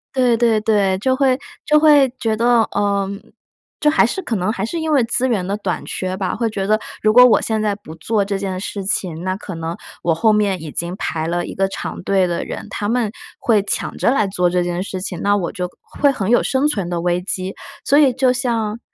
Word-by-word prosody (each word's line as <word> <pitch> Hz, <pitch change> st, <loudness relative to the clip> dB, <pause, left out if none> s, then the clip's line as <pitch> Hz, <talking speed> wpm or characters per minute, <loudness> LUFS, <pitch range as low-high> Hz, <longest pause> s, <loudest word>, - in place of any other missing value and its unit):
对 245 Hz, -3 st, +3 dB
对 225 Hz, -2 st, +2 dB
对， 205 Hz, -3 st, +2 dB
就 260 Hz, +5 st, +1 dB
会 260 Hz, -1 st, +2 dB, 0.3 s
就 300 Hz, -, +4 dB
会 295 Hz, -3 st, +6 dB
觉 220 Hz, -1 st, -1 dB
得， 235 Hz, 0 st, +4 dB
呃， 200 Hz, -1 st, 0 dB, 0.8 s
就 300 Hz, 0 st, +4 dB
还 310 Hz, -, +4 dB
是 310 Hz, +11 st, -2 dB
可 230 Hz, -, -2 dB
能 185 Hz, +3 st, -1 dB
还 225 Hz, -, -2 dB
是 330 Hz, +9 st, -4 dB
因 315 Hz, -1 st, -1 dB
为 270 Hz, -, +4 dB
资 240 Hz, +3 st, 0 dB
源 210 Hz, -7 st, 0 dB
的 200 Hz, +2 st, -2 dB
短 185 Hz, -5 st, -3 dB
缺 185 Hz, 0 st, -3 dB
吧， 190 Hz, -1 st, -2 dB
会 230 Hz, 0 st, -1 dB
觉 195 Hz, -2 st, -3 dB
得 215 Hz, +2 st, +2 dB, 0.2 s
如 215 Hz, -, +4 dB
果 250 Hz, +2 st, +8 dB
我 250 Hz, -, +5 dB
现 220 Hz, -1 st, -1 dB
在 210 Hz, -1 st, 0 dB
不 200 Hz, -6 st, -12 dB
做 205 Hz, +5 st, 0 dB
这 200 Hz, 0 st, -2 dB
件 190 Hz, -1 st, -3 dB
事 200 Hz, +1 st, -5 dB
情， 175 Hz, -3 st, -2 dB
那 185 Hz, 0 st, -1 dB
可 190 Hz, -3 st, -8 dB
能 165 Hz, +1 st, -4 dB, 0.3 s
我 165 Hz, -2 st, +2 dB
后 220 Hz, +5 st, +3 dB
面 200 Hz, -5 st, +1 dB
已 155 Hz, -, -7 dB
经 170 Hz, +4 st, -3 dB
排 160 Hz, -4 st, -3 dB
了 175 Hz, +1 st, -1 dB
一 -, -, -7 dB
个 195 Hz, 0 st, +1 dB
长 -, -, -6 dB
队 190 Hz, 0 st, +2 dB
的 170 Hz, -1 st, -2 dB
人， -, -, -6 dB
他 205 Hz, 0 st, -3 dB
们 230 Hz, -2 st, 0 dB, 0.3 s
会 220 Hz, -4 st, +3 dB
抢 205 Hz, -, -3 dB
着 -, -, +2 dB
来 240 Hz, -4 st, +2 dB
做 180 Hz, -2 st, +1 dB
这 180 Hz, 0 st, +1 dB
件 175 Hz, +1 st, -2 dB
事 185 Hz, -1 st, -5 dB
情， 180 Hz, -2 st, -4 dB
那 205 Hz, 0 st, +2 dB
我 180 Hz, -4 st, -2 dB
就 180 Hz, 0 st, -3 dB, 0.3 s
会 285 Hz, -, +5 dB
很 215 Hz, -7 st, -2 dB
有 240 Hz, -, +5 dB
生 265 Hz, +2 st, 0 dB
存 200 Hz, -12 st, 0 dB
的 170 Hz, -1 st, -2 dB
危 175 Hz, 0 st, 0 dB
机。 185 Hz, +1 st, -3 dB, 0.3 s
所 285 Hz, -, +4 dB
以 275 Hz, -4 st, +5 dB
就 260 Hz, 0 st, +2 dB
像 235 Hz, -4 st, -1 dB
205 Hz, 255 characters per minute, -19 LUFS, 185-240 Hz, 0.8 s, 果